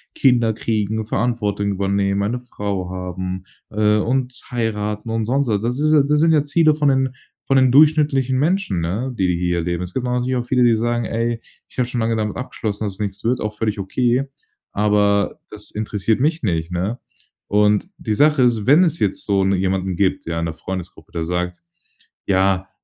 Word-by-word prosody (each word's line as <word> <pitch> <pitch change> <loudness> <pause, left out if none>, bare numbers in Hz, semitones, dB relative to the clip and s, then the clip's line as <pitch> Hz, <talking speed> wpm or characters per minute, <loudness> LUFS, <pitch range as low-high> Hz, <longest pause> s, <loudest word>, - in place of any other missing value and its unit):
Kinder 120 -4 +3
kriegen, 110 0 -1
Verantwortung 105 -2 -1
übernehmen, 100 0 0
eine 115 +5 -1
Frau 100 -6 -4
haben, 90 0 -5 0.3
äh, 105 0 +2
und 125 +3 0 0.2
heiraten 105 -2 -2
und 115 -1 -1
sonst 135 +4 +1
so. 105 -3 +2
Das 120 +4 -2
ist 155 +2 +2
ja 150 -2 +5
das 150 +1 +2
sind 165 0 +4
ja 150 -2 +3
Ziele 155 +1 +3
von 150 -1 0
den 135 -1 +2 0.4
von 135 - +3
den 130 -1 +5
durchschnittlichen 145 -3 +4
Menschen, 170 - 0
ne? 105 +11 -2
Die, 95 - +2
die 90 -1 0
hier 90 0 0
leben. 85 +1 -2
Es 90 0 -7
gibt 130 - -2
aber 125 0 0
natürlich 125 +1 -1
auch 120 - -2
viele, 125 0 +2
die 120 -1 +5
sagen: 120 +1 0
„Ey, 115 +1 -2 0.3
ich - - -19
habe 125 - +2
schon 125 -1 -3
lange 115 0 +1
damit 105 -1 -2
abgeschlossen, 110 -4 -4
dass 100 - -3
es 95 - -14
nix 100 -1 -4
wird.", 125 +2 +1
auch 105 0 -3
völlig 110 -1 -1
okay, 120 +6 +1 0.5
aber 105 0 +1
das 105 -1 -10
interessiert 110 +1 -1
mich 155 +2 +1
nicht, 85 -4 -1
ne? 95 +7 -2 0.5
Und, 105 - +2
die 110 - -2
Sache 150 +4 +4
ist, 115 -4 +2
wenn 150 +7 +7
es 165 -1 -1
jetzt 100 -2 -1
so 100 -2 +2
jetzt 95 - +2
'ne 100 - +2
jemanden 95 0 -1
gibt, 95 -1 0
ja, 85 0 -2
in 85 - -1
der 80 - -3
Freundesgruppe, 90 +1 -7
der 85 -1 -3
sagt: 90 +1 -2 0.7
„Ja, 95 0 +2
110 Hz, 205 wpm, -20 LUFS, 95-125 Hz, 0.7 s, wenn